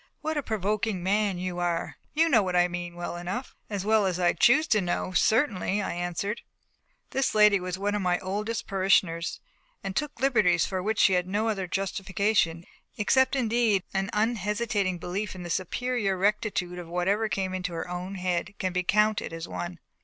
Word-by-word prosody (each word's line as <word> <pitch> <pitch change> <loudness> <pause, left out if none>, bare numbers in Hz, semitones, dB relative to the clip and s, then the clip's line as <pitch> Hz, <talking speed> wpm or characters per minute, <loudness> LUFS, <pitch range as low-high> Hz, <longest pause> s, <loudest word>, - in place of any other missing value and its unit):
"What 315 +1 -2
a 295 - 0
provoking 215 -4 -1
man 200 0 +1
you 180 0 -3
are! 175 -1 -2 0.2
You 325 +2 +4
know 245 -9 +5
what 185 -2 -2
I 175 0 +5
mean 175 -1 -5
well 175 0 -5
enough." 185 +9 -5
"As 200 -2 -3
well 215 -2 +3
as 180 -1 -1
I 175 -1 +3
choose 295 +6 +5
to 215 - +4
know 180 0 -2
certainly," 210 -1 +2
I 205 - -2
answered. 175 +5 -3 0.7
This 270 -4 0
lady 210 -2 +6
was 180 0 -4
one 205 +1 -1
of 210 - 0
my 180 -1 +2
oldest 210 +5 -3
parishioners, 185 -4 +1 0.4
and 190 - -4
took 295 0 -2
liberties 210 -11 +3
for 190 -2 -2
which 215 +3 -1
she 195 - +5
had 180 0 +1
no 210 +4 0
other 195 -4 -2
justification, 195 -2 0 0.3
except 260 +6 +3
indeed 230 -5 +2
an 195 +1 -1
unhesitating 210 -3 0
belief 190 +4 -4
in 180 - -7
the 175 - -5
superior 205 +1 -1
rectitude 195 -3 0
of 175 - -8
whatever 195 +5 0
came 190 -2 -2
into 180 -1 -3
her 165 +1 -4
own 180 +2 -5
head 180 +1 -2
can 185 -2 -2
be 180 - +1
counted 210 +2 +2
as 165 0 -6
one. 175 0 -5
195 Hz, 185 wpm, -27 LUFS, 180-215 Hz, 0.7 s, lady